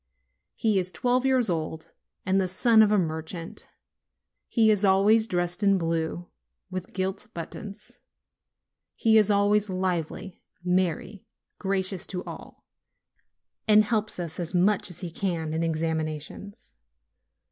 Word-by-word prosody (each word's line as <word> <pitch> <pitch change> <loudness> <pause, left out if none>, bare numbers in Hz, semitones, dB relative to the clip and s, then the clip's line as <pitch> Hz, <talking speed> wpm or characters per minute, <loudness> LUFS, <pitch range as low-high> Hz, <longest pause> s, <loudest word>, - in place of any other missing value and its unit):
He 215 -4 +2
is 185 0 -1
twelve 250 +3 +1
years 255 -3 +3
old, 160 -2 -2 0.3
and 190 +1 +2
the 185 - 0
son 220 +5 +4
of 215 -1 +4
a 210 - +4
merchant; 165 0 -4 0.8
he 220 -2 +4
is 210 -1 +3
always 205 +3 +4
dressed 175 0 -1
in 200 -1 +4
blue, 165 0 -2 0.4
with 185 -1 -6
gilt 190 +1 -3
buttons; 195 +4 -8 1.0
he 220 -1 +4
is 210 -1 +3
always 205 0 +2
lively, 185 0 -3 0.2
merry, 180 +2 -1 0.3
gracious 190 -2 -1
to 180 -1 -4
all, - - -11 1.0
and 215 0 +6
helps 215 -2 -1
us 170 -1 -5
as 175 +1 -4
much 190 +2 +2
as 175 - -5
he 175 -3 -5
can 165 -3 -2
in 160 - -1
examinations. 160 +6 -3
185 Hz, 130 wpm, -26 LUFS, 170-210 Hz, 1.0 s, and